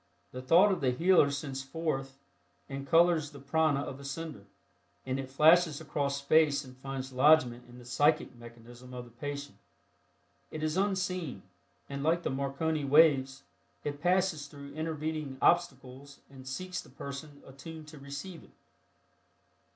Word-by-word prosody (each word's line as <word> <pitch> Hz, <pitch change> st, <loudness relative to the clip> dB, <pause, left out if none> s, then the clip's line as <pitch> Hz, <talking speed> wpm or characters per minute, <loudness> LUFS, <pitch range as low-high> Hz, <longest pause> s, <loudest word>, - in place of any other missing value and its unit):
The 125 Hz, -, -6 dB
thought 175 Hz, +10 st, +5 dB
of 190 Hz, -, -1 dB
the 130 Hz, -, +2 dB
healer 165 Hz, +3 st, +4 dB
sends 140 Hz, -2 st, -4 dB
forth 135 Hz, -2 st, -3 dB, 0.5 s
and 135 Hz, 0 st, -6 dB
colors 165 Hz, -2 st, +4 dB
the 145 Hz, -1 st, -12 dB
prana 145 Hz, +1 st, +1 dB
of 140 Hz, -1 st, -6 dB
the -, -, -11 dB
sender, 140 Hz, -6 st, -6 dB, 0.6 s
and 130 Hz, +1 st, -2 dB
it 135 Hz, -1 st, -5 dB
flashes 155 Hz, +2 st, +5 dB
across 140 Hz, -1 st, -2 dB
space 145 Hz, 0 st, +3 dB
and 130 Hz, 0 st, -13 dB
finds 130 Hz, 0 st, -6 dB
lodgment 125 Hz, -3 st, +4 dB
in 120 Hz, -, -13 dB
the 125 Hz, -, -13 dB
psychic 145 Hz, +3 st, +1 dB
mechanism 120 Hz, +1 st, -13 dB
of 125 Hz, 0 st, -6 dB
the 120 Hz, -, -16 dB
patient. 140 Hz, +4 st, -7 dB, 0.9 s
It 155 Hz, -, -6 dB
is 155 Hz, 0 st, 0 dB
unseen, 185 Hz, -, -1 dB, 0.4 s
and 140 Hz, 0 st, -5 dB
like 165 Hz, +4 st, +1 dB
the -, -, -1 dB
Marconi 140 Hz, +3 st, -1 dB
waves, 135 Hz, -2 st, +4 dB, 0.4 s
it 145 Hz, 0 st, -4 dB
passes 180 Hz, -4 st, +1 dB
through 140 Hz, -1 st, -11 dB
intervening 155 Hz, -3 st, -4 dB
obstacles 140 Hz, -5 st, 0 dB
and 130 Hz, -1 st, -12 dB
seeks 180 Hz, +7 st, -4 dB
the -, -, -17 dB
person 140 Hz, +2 st, -9 dB
attuned 155 Hz, +4 st, -10 dB
to 150 Hz, -2 st, -12 dB
receive 140 Hz, +6 st, -8 dB
it. -, -, -20 dB
140 Hz, 150 wpm, -30 LUFS, 135-160 Hz, 0.9 s, thought